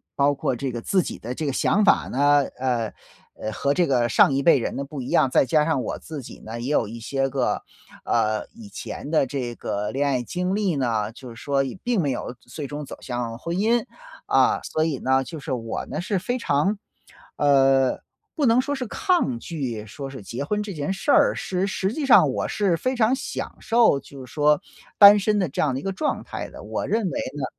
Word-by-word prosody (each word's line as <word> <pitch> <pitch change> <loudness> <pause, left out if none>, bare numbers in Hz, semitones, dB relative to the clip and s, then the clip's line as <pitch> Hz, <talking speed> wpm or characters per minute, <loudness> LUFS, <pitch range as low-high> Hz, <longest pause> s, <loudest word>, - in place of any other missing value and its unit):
包 140 +1 +3
括 130 - -1
这 135 +1 -3
个 120 -1 -5
自 185 +7 +2
己 - - -5
的 120 +3 -6
这 155 - -4
个 - - +1
想 210 +8 +2
法 - - +4
呢， 145 +2 +4 0.2
呃 120 -4 -1 0.5
呃， 110 - -3
和 140 +6 0
这 175 +1 +2
个 120 -3 +2
上 135 - +5
一 135 0 0
辈 155 -6 +6
人 - - -3
的 140 - -3
不 140 -2 -7
一 125 - -6
样， 130 - +3
再 - - +4
加 150 +1 +3
上 160 -6 +1
我 - - -3
自 155 -3 -7
己 - - -11
呢， 115 +2 -6
也 130 +5 -3
有 115 - +2
一 115 +2 -8
些 135 +3 -1
个， - - -1 0.4
呃， 110 0 +1
以 220 -3 -12
前 150 - -7
的 155 -4 +3
这 125 -3 -4
个 105 0 -3
恋 140 +2 0
爱 130 -3 0
经 180 - -2
历 195 -8 0
呢， 115 -4 0
就 130 +2 -12
是 115 - -10
说 140 +3 0
也 135 +7 -5
并 240 -5 +1
没 140 -3 0
有 125 - -4
最 150 - -8
终 145 +1 -6
走 - - -9
向 120 -2 -4
婚 170 +5 -3
姻。 230 +3 +2 0.4
啊， - - +3
所 155 - -1
以 155 -5 -1
呢， 130 +1 +2
就 160 +2 -8
是 135 - -6
我 115 -3 -3
呢 - - -4
是 190 +2 -1
非 245 +7 -2
常， 190 +5 +1 0.6
呃， 135 -2 +3 0.3
不 290 -6 +1
能 230 +2 +5
说 285 +2 0
是 255 -4 -3
抗 350 - +1
拒， 120 -7 -5
说 135 +6 -7
是 130 -6 -9
结 120 +7 -5
婚 210 +7 -1
这 200 -2 -6
件 150 +4 -3
事 195 +9 -1
儿， - - +5
是 190 +1 -2
实 195 +2 -1
际 290 -2 -2
上 - - +7
我 - - -2
是 195 -5 +1
非 255 +10 -1
常 235 +1 +3
享 265 - -4
受， 230 - +4
就 135 -2 -11
是 - - -16
说 150 0 +3 0.4
单 205 0 +10
身 210 +1 +1
的 185 -4 +1
这 135 - -3
样 140 -4 +1
的 - - -2
一 - - -10
个 195 - -1
状 295 +10 -2
态 - - -6
的， - - -11
我 - - -3
认 220 -3 0
为 - - -3 0.2
呢 135 - -2
145 Hz, 250 characters per minute, -24 LUFS, 130-195 Hz, 0.6 s, 单